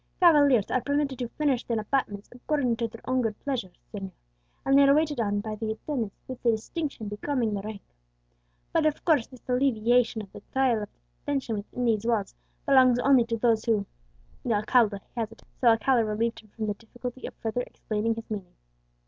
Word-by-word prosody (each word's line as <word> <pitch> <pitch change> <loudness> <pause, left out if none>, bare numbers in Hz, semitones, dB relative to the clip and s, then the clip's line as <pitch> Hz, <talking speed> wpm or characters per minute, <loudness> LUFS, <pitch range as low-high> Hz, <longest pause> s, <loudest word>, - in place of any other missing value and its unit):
"Cavaliers 285 - +5
are 255 - +2
permitted 285 -2 -1
to 245 - -2
furnish 275 -1 0
their 230 -2 -1
apartments 210 -3 -2
according 250 -1 0
to 230 - -1
their 230 0 -13 0.2
good 225 -3 -2
pleasure, 260 -9 -2 0.2
señor; 195 -2 -5 0.6
and 270 - +4
they 280 - +7
are 280 0 +6
waited 300 -3 +1
on 205 -2 0
by 215 0 -5
the 220 +1 -3
attendants 230 -3 -4
with 255 -1 -7
the 240 - +2
distinction 230 +2 -2
becoming 225 +2 -1
their 200 - -2
rank. 210 0 -7 0.9
But, 320 -2 +3
of 300 - -2
course, 300 -9 +3
this 255 -2 -16
alleviation 245 -3 +2
of 195 - -14
the - - -11
trial 260 -5 +2
of 210 - -6 0.3
detention 270 -6 -2
within 230 +4 -4
these 220 -3 +2
walls 220 -4 0 0.3
belongs 260 -4 +6
only 255 -1 +4
to 230 0 -2
those 225 -1 +2
who 215 -4 +2 0.3
" - - -31
The 230 - +1
alcalde 210 0 +3 0.2
hesitated, 225 -1 -5
so 250 - +2
Alcala 230 +2 +4
relieved 225 +2 -1
him 215 - -18
from 215 +1 -4
the 210 - 0
difficulty 245 +4 -8
of - - -10
further 225 +2 -2
explaining 225 -1 -2
his 225 0 -8
meaning. 195 -4 -5
235 Hz, 190 wpm, -27 LUFS, 215-265 Hz, 0.9 s, they